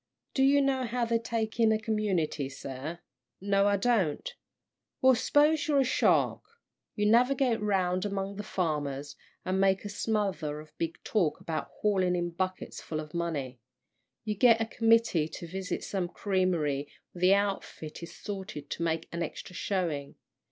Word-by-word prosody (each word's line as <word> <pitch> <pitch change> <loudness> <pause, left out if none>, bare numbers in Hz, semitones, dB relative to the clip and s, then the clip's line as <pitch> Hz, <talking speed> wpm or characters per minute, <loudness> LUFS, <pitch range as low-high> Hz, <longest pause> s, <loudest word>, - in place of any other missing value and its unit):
Do 265 - +1
you 280 +1 +5
know 265 -2 +1
how 240 +1 -1
they 230 0 +1
take 225 -1 -3
in 225 -1 +5
a 220 - +3
community, 200 -10 -1
sir?" 135 +5 -7 0.4
"No, 200 +1 +2
I 200 0 +3
don't." 195 -8 +1 0.7
"Well, 260 0 +6
s'pose 290 +4 +3
you're 285 -2 +4
a - - +4
shark. 260 - +2 0.5
You 210 - 0
navigate 245 +1 +3
round 185 -3 +1
among 200 -1 -3
the - - -3
farmers, 145 -7 -2 0.3
and 190 +1 +1
make 195 +1 +2
a - - -3
smother 195 -9 -1
of 155 0 -14
big 165 0 -2
talk 175 -9 +1
about 160 -1 -3
hauling 190 -4 +1
in 175 -1 -1
buckets 185 +2 -4
full 155 - -4
of 155 0 -8
money. 145 -7 -3 0.7
You 215 - 0
get 230 +2 +5
a 225 - +1
committee 225 -8 +3
to 170 - -8
visit 185 +2 -4
some 190 -3 -2
creamery 175 -8 0 0.2
where 175 - -11
the 185 +2 +6
outfit 195 -6 -3
is 170 - -8
salted 190 -8 -7
to - - -4
make 165 -1 -1
an 170 - -4
extra 170 +3 -5
showing. 170 -8 -2
190 Hz, 165 wpm, -29 LUFS, 165-220 Hz, 0.7 s, Well